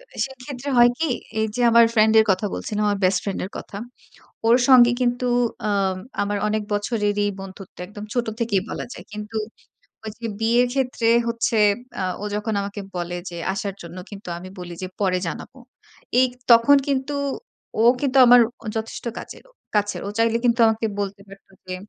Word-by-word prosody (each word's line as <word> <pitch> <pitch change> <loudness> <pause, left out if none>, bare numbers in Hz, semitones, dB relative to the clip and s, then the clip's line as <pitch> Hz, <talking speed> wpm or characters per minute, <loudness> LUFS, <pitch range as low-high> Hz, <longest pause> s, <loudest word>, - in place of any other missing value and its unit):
এ - - -13
সেক্ষেত্রে 265 +1 -8
হয় 240 0 +7
কি? 325 -3 0 0.3
এই 220 - +2
যে, 245 - -1
আমার 235 0 +7
ফ্রেন্ডের 220 0 +5
কথা 190 +3 -1
বলছিলাম, 210 0 -3
আমার 205 -1 0
বেস্ট 185 0 +3
ফ্রেন্ডের 195 -1 -3
কথা। 200 - -8 0.7
ওর 235 +2 +6
সঙ্গে 245 -2 +7
কিন্তু 245 0 0 0.4
অ্যাম 195 -3 0 0.2
আমার 205 0 -1
অনেক 215 0 0
বছরেরই 205 -1 0
বন্ধুত্ব। 195 0 -11
একদম 210 +1 -9
ছোট 245 -1 0
থেকেই 220 -5 +1
বলা - - -4
যায়। - - -11
কিন্তু 210 +1 -6 0.7
ওই 215 - -4
যে, 230 - -5
বিয়ের 235 +2 +3
ক্ষেত্রে 255 -3 0 0.2
হচ্ছে 230 -1 0 0.4
অ্যা 185 - -2 0.2
ও - - -3
যখন 210 +1 -2
আমাকে 200 +1 -5 0.2
বলে 175 0 -3
যে, 170 - -8 0.2
আসার 195 0 -4
জন্য। 170 +1 -10
কিন্তু, 200 -2 -10
আমি 185 +1 -9
বলি 175 -1 -7
যে, - - -2
"পরে 185 -2 +2
জানাবো।" 250 +9 -7 0.6
এই 260 - +6 0.2
তখন 235 +5 +7
কিন্তু 275 +1 -1 0.7
ও - - +4 0.2
কিন্তু 275 -2 +1
আমার 245 0 +8 0.4
যথেষ্ট 220 +2 -5
কাজেরও - - -11 0.2
কাছের। 205 0 0
ও - - -3
চাইলে 230 0 +2
কিন্তু 235 -1 +2
আমাকে 220 0 +1
বলতে 200 0 -4
পারত 195 0 -15 0.2
যে, 185 - -4
220 Hz, 175 wpm, -22 LUFS, 200-240 Hz, 0.7 s, আমার